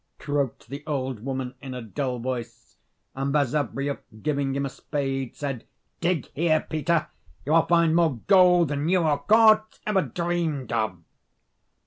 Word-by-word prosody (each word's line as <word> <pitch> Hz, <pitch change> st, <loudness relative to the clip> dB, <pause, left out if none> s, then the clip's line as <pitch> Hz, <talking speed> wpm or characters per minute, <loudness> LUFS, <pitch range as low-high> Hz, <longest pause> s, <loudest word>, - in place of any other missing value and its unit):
croaked 140 Hz, -5 st, -2 dB
the 140 Hz, +2 st, -7 dB
old 130 Hz, -6 st, -3 dB
woman, 130 Hz, -1 st, -3 dB
in 135 Hz, -2 st, -7 dB
a 125 Hz, -, -5 dB
dull 125 Hz, +3 st, -3 dB
voice: 115 Hz, -2 st, -6 dB, 0.4 s
and 135 Hz, +1 st, -2 dB
Basavriuk, 140 Hz, -1 st, 0 dB, 0.2 s
giving 140 Hz, -3 st, 0 dB
him 140 Hz, 0 st, -1 dB
a -, -, -2 dB
spade, 135 Hz, -2 st, -3 dB
said, 135 Hz, -5 st, -4 dB, 0.4 s
"Dig 170 Hz, -5 st, 0 dB
here, 155 Hz, 0 st, +1 dB
Peter: 160 Hz, +1 st, 0 dB, 0.4 s
you 145 Hz, -, -2 dB
will 165 Hz, 0 st, +4 dB
find 170 Hz, -2 st, +4 dB
more 165 Hz, -5 st, +3 dB
gold 180 Hz, -4 st, +5 dB
than 145 Hz, +2 st, -1 dB
you 185 Hz, 0 st, +3 dB
or 150 Hz, -3 st, +2 dB
Korzh 215 Hz, +5 st, +4 dB
ever 210 Hz, -3 st, +2 dB
dreamed 170 Hz, -8 st, -2 dB
of." 110 Hz, -5 st, 0 dB
145 Hz, 150 wpm, -25 LUFS, 130-170 Hz, 0.4 s, gold